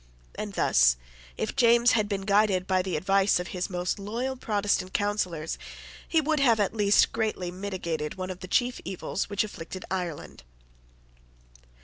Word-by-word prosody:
And - - -5
thus, - - +4 0.4
if - - -3
James 235 0 +5
had 215 -2 +1
been 200 -2 -1
guided 200 -2 +2
by 185 -1 +2
the 185 -1 -3
advice 195 +3 +3
of 180 - -5
his 180 -1 -3
most 180 +2 -2
loyal 235 +6 -3
Protestant 205 -5 -1
counsellors, 185 -6 -1 0.5
he 325 - +3
would 310 0 +1
have 235 -5 +4
at 205 - +1
least 210 -2 +4
greatly 215 -6 -2
mitigated 175 -5 -4
one 185 0 -4
of 180 - -8
the 185 - -8
chief 245 +5 +1
evils 190 +2 -4
which 205 0 +1
afflicted 185 -2 -7
Ireland. 175 - -4
195 Hz, 155 wpm, -27 LUFS, 180-215 Hz, 0.5 s, James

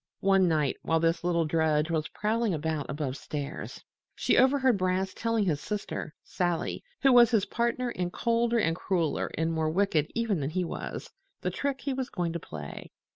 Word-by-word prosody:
One 195 -1 +4
night, 150 -5 +1
while 165 0 +1
this 165 +1 +1
little 170 -2 +2
drudge 155 0 +1
was 155 -2 0
prowling 215 -2 0
about 155 -1 -2
above 140 -2 -3
stairs, 145 -2 -6 0.3
she - - +2
overheard 265 -2 +4
Brass 185 +1 0
telling 230 -2 0
his 150 -5 0
sister, 205 -6 -4
Sally 175 -2 -2 0.2
(who 270 -2 +6
was 240 -2 +8
his 220 -5 +2
partner 235 +1 -1
and 180 -5 -3
colder 235 +2 +1
and 165 -7 +2
crueler 175 -3 -1
and 160 +1 0
more 160 -1 0
wicked 165 -3 +1
even 230 -6 0
than 140 -1 -2
he 180 +3 -1
was), - - -6 0.3
the 180 - -1
trick 275 +6 -2
he 275 +2 -2
was 260 -1 -3
going 175 -3 -2
to 170 - -3
play. 75 - -8
180 Hz, 180 wpm, -28 LUFS, 160-230 Hz, 0.3 s, was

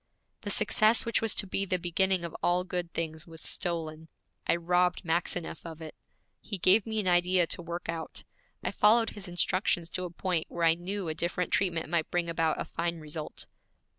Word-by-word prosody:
The 205 - -5
success 215 +2 +4
which 230 - +1
was 225 -3 +3
to - - +2
be 195 +1 -1
the 185 -1 0
beginning 180 +1 +1
of 170 - -7
all 175 +1 +2
good 180 -2 -4
things 160 0 -3
was 165 -1 -9
stolen. 160 -4 -2 0.4
I - - +4
robbed 180 +2 +1
Maxineff 170 0 -1
of 165 -2 -8
it. 160 -2 -8 0.5
He 205 - -5
gave 195 +4 +5
me 220 -1 0
an 200 - -1
idea 175 0 +4
to 170 - -3
work 170 +1 -6
out. 165 -1 -5 0.4
I - - -1
followed 225 +2 +4
his 200 -2 -7
instructions 175 -1 0
to 185 - -3
a - - -5
point 175 -1 -1
where 170 - -3
I 165 - +6
knew 185 +2 -4
a 160 - -1
different 175 +2 -2
treatment 170 -4 +1
might 165 0 0
bring 175 -1 0
about 165 -1 0
a - - -2
fine 170 0 -2
result. 155 0 -6
175 Hz, 195 wpm, -29 LUFS, 165-185 Hz, 0.5 s, I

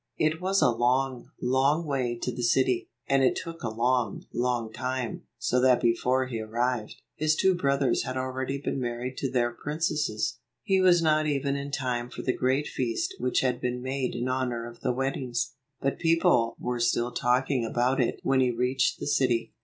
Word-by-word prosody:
154 - - +2
It 160 +2 -3
was 195 -1 +3
a 130 - +5
long, 125 +1 0
long 135 +6 +2
way 130 -5 -1
to 125 - -3
the 120 +1 -5
city, 125 +1 +2 0.2
and 135 -1 +3
it 130 - +3
took 165 0 -6
a 115 - -2
long, 120 -1 0
long 120 -2 -1
time, 130 -2 -3
so 125 +2 +1
that 125 -1 +5
before 125 +2 +2
he 120 -3 -4
arrived, 115 +1 -2 0.2
his 155 0 +2
two 190 +2 +3
brothers 140 -6 +1
had 130 - -4
already 130 +1 -2
been 135 - -2
married 125 +1 -3
to 135 - -1
their 120 -2 +1
princesses. 150 -5 -2 0.2
He 190 -1 +2
was 175 -2 +5
not 155 -1 +3
even 140 -1 0
in 140 0 -4
time 125 -3 -2
for - - -7
the 130 - +1
great 130 +3 +1
feast 345 - -2
which 125 - +1
had 125 -2 0
been 125 0 -1
made 130 -1 -2
in 120 +1 -2
honor 125 -2 -1
of 120 0 -11
the 125 - 0
weddings, 130 -2 -2 0.3
but 135 - -1
people 165 -8 +3
were 125 0 -3
still 120 +1 +1
talking 125 +1 +1
about 125 +3 +1
it 120 - -1
when 135 0 +2
he 130 -1 +3
reached 125 +2 0
the - - -4
city. 120 -5 +1
130 Hz, 195 wpm, -27 LUFS, 120-140 Hz, 0.3 s, a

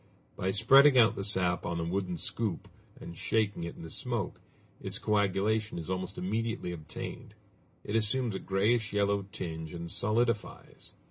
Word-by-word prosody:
By 95 - -1
spreading 130 +7 +6
out 115 -2 +6
the 100 - -3
sap 95 -3 +1
on 85 0 -2
a - - -1
wooden 90 +1 -2
scoop, 105 +1 -3 0.3
and 85 - -9
shaking 105 -2 0
it 85 - -6
in - - -10
the 80 - -8
smoke, 120 -4 -3 0.4
its - - -2
coagulation 105 +1 +1
is 85 +2 -4
almost 95 +1 -3
immediately 110 0 -2
obtained; 80 -3 -8 0.5
it 105 - -3
assumes 115 +1 +2
a 95 - -3
grayish 110 +3 +1
yellow 100 -1 +1
tinge 80 -2 -5
and 85 0 -6
solidifies. 115 +1 -2
100 Hz, 155 wpm, -30 LUFS, 90-110 Hz, 0.5 s, spreading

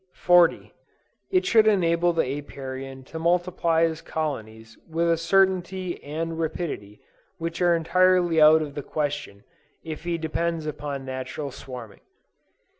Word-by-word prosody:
40. 175 -1 +3 0.6
It 370 -1 +2
should 220 -1 +5
enable 175 -4 +3
the 165 - +1 0.2
Apiarian 135 -1 -8
to 160 +5 -8
multiply 170 -1 +1
his 165 -1 0
colonies 115 -9 -5
with 165 +1 0
a - - +4
certainty 185 +1 +1
and 160 +3 -4
rapidity 155 - -4 0.4
which 165 +1 -4
are 175 -1 +4
entirely 175 0 +3
out 155 +1 +7
of 145 -2 -7
the 145 - -4
question, 140 -9 -4 0.4
if 160 -1 -7
he 170 -1 -1
depends 165 0 -2
upon 145 -2 -5
natural 130 +2 -5
swarming. 125 -4 -10
160 Hz, 130 wpm, -25 LUFS, 140-175 Hz, 0.6 s, out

